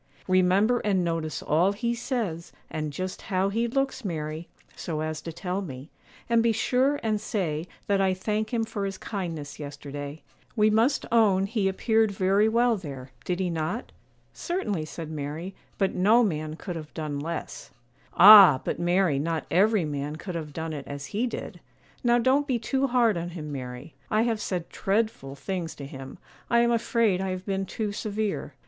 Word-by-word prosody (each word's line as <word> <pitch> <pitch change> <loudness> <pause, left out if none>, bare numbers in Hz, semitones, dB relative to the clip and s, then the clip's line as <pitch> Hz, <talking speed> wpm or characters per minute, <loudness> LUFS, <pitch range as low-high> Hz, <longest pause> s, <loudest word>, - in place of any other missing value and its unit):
'Remember 185 +6 +3
and 195 -3 +1
notice 165 -2 -2
all 175 +6 +3
he 235 +3 -1
says, 225 - -3 0.2
and 155 -1 -3
just 185 +5 -5
how 190 0 0
he 230 +4 0
looks, 270 +1 -1
Mary, 160 -3 -4 0.3
so 155 -3 -4
as 155 0 -3
to 165 - -6
tell 180 +3 -3
me; 140 -4 -8 0.4
and 235 -1 +3
be 230 0 +3
sure 255 +5 +1
and 215 -2 0
say 170 -7 -2 0.2
that 200 -1 +2
"I 190 -1 +2
thank 215 +3 -2
him 235 -2 +1
for 210 -2 -3
his 195 -1 -4
kindness 165 -8 -5
yesterday;" 145 0 -7 0.3
we 215 -1 +4
must 230 +6 +2
own 205 -5 +4
he 205 -1 0
appeared 220 +3 +2
very 200 +2 +2
well 235 0 +3
there; 135 -7 -8
did 180 0 -1
he 180 -2 0
not?' 165 +8 -3 0.4
'Certainly,' 210 - -2
said 160 0 -7
Mary; 155 +5 -5 0.2
'but 195 -2 +1
no 215 +6 +4
man 155 -6 -2
could 180 +1 -6
have 155 -2 -7
done 150 -3 -3
less.' 165 +3 -5 0.5
'Ah! 195 -8 +10
but - - -2
Mary, 175 -4 +2
not 160 +2 -2
every 200 0 +3
man 145 0 -3
could 180 +3 -6
have 160 -3 -5
done 160 +1 -4
it 145 -2 -6
as 140 0 -7
he 230 +5 +1
did; 235 - -6 0.4
now 240 0 +4
don't 265 +4 +2
be 255 -4 +1
too 265 +4 0
hard 240 -6 +3
on 170 +1 -3
him, 155 -4 -7
Mary; 130 +2 -7 0.2
I 215 +1 +3
have 225 -2 0
said 180 -3 -3
dreadful 195 -10 -1
things 175 +1 -4
to 140 - -8
him; 135 -1 -9 0.3
I 235 0 +4
am 235 0 +3
afraid 230 -4 +2
I 190 - -2
have 185 0 -4
been 195 -1 -2
too 215 +1 -3
severe. 205 -8 -3
190 Hz, 180 wpm, -26 LUFS, 155-220 Hz, 0.5 s, Ah